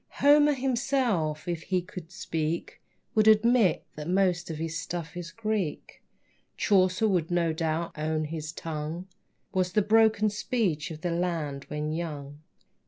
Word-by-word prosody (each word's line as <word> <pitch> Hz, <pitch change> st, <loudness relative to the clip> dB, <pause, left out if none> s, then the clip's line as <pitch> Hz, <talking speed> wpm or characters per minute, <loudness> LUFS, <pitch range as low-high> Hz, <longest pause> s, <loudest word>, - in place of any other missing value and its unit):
Homer 295 Hz, +1 st, +5 dB
himself, 245 Hz, -, 0 dB
if 170 Hz, -2 st, -2 dB
he 185 Hz, +2 st, 0 dB
could 180 Hz, -2 st, -8 dB
but 165 Hz, -, -26 dB
speak, 165 Hz, -2 st, -3 dB, 0.3 s
Would 215 Hz, 0 st, +3 dB
admit 220 Hz, -3 st, +4 dB
that 150 Hz, +2 st, -6 dB
most 180 Hz, -2 st, +2 dB
of 160 Hz, -, -4 dB
his 165 Hz, +1 st, -3 dB
stuff 170 Hz, -2 st, -5 dB
is 175 Hz, -1 st, -5 dB
Greek. 215 Hz, -5 st, -3 dB, 0.6 s
Chaucer 185 Hz, +1 st, +3 dB
would 180 Hz, -5 st, +1 dB
no 170 Hz, -2 st, +1 dB
doubt 160 Hz, +1 st, -2 dB
own 155 Hz, 0 st, -1 dB
his 155 Hz, 0 st, -5 dB
tongue 160 Hz, +2 st, -5 dB, 0.5 s
Was 185 Hz, -1 st, 0 dB
the 210 Hz, -, +3 dB
broken 215 Hz, 0 st, +4 dB
speech 200 Hz, -8 st, -1 dB
of 155 Hz, -1 st, -8 dB
the 175 Hz, -, -1 dB
land 165 Hz, -5 st, -2 dB
when 150 Hz, 0 st, -3 dB
young. 150 Hz, -3 st, -5 dB
175 Hz, 150 wpm, -28 LUFS, 155-210 Hz, 0.6 s, Homer